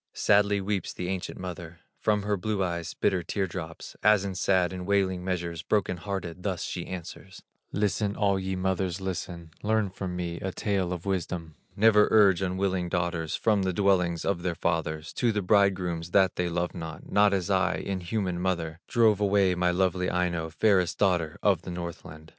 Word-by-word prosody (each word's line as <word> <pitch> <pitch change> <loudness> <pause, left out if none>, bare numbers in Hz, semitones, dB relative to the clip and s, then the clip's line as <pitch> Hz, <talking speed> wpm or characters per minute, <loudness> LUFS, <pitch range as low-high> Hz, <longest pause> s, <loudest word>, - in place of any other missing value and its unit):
Sadly 100 0 +3
weeps 95 -2 -2
the 90 - -4
ancient 95 -1 -4
mother 85 -2 -7 0.2
From 105 -2 +1
her 105 0 0
blue 100 +1 -1
eyes 85 -2 -3
bitter 90 - +1
tear 95 +3 -1
drops, 80 -3 -7
As 105 -2 +4
in 95 - -3
sad 95 -1 +1
and 90 0 -6
wailing 95 -3 +1
measures, 85 -3 -3
Broken 95 -2 0
hearted 90 -2 -5
thus 95 -3 -2
she 85 - -4
answers: 95 +1 -8 0.3
"Listen, 100 0 0
all 100 -2 +2
ye 95 0 -3
mothers, 95 -1 -1
listen, 85 -3 -5
Learn 110 -2 +1
from 95 -1 -5
me 85 -1 -4
a 95 - -3
tale 95 -2 -1
of 90 -1 -5
wisdom: 90 -4 -3 0.2
Never 105 0 +5
urge 100 -4 +5
unwilling 95 -1 -1
daughters 85 -2 -1
From 105 -3 +2
the 95 -1 0
dwellings 90 -3 +2
of 95 -3 0
their 85 -1 -2
fathers, 80 -2 -2
To 120 - +1
the 105 -2 -1
bridegrooms 90 -4 +2
that 95 -1 +4
they 90 -1 -1
love 85 +1 -2
not, 80 -3 -8
Not 100 0 +5
as 95 0 -1
I, 95 -1 +2
inhuman 95 -1 -2
mother, 85 -3 -2
Drove 110 -4 +3
away 100 -2 +3
my 90 0 +1
lovely 90 0 +1
Aino, 85 -2 -1
Fairest 90 +1 +2
daughter 90 -6 +1
of 95 -5 +3
the 90 - -8
Northland." 85 -3 -7
95 Hz, 180 wpm, -27 LUFS, 85-100 Hz, 0.3 s, Never